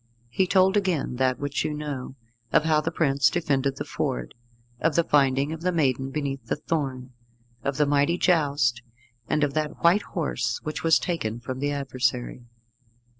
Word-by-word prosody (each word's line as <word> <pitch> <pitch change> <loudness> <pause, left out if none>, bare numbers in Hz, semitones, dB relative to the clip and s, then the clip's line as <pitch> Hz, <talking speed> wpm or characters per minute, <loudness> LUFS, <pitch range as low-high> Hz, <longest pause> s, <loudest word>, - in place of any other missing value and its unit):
He 185 +10 +1
told 190 +1 +4
again 180 -11 0
that 130 -1 +1
which 145 0 -2
you 150 - -2
know, 145 -3 -5 0.4
of - - +4
how 155 -1 +3
the 160 - -1
prince 140 -6 +2
defended 140 -5 0
the - - -4
Ford, 60 - -3 0.5
of 165 -1 +1
the 170 - +4
finding 140 -1 +2
of 160 - -7
the 180 +1 +1
maiden 135 -5 +1
beneath 135 -2 -3
the - - 0
thorn, 135 -5 -3 0.5
of 140 0 -2
the 150 - +3
mighty 145 +4 +2
joust, 145 -10 +2 0.5
and 150 - +1
of 145 -1 0
that 155 0 -3
white 175 +5 +5
horse 120 - -2
which 155 - -4
was 165 -1 +5
taken 120 -11 -3
from 130 +2 -6
the 145 +1 0
adversary. 130 -3 -2
145 Hz, 175 wpm, -25 LUFS, 130-160 Hz, 0.5 s, white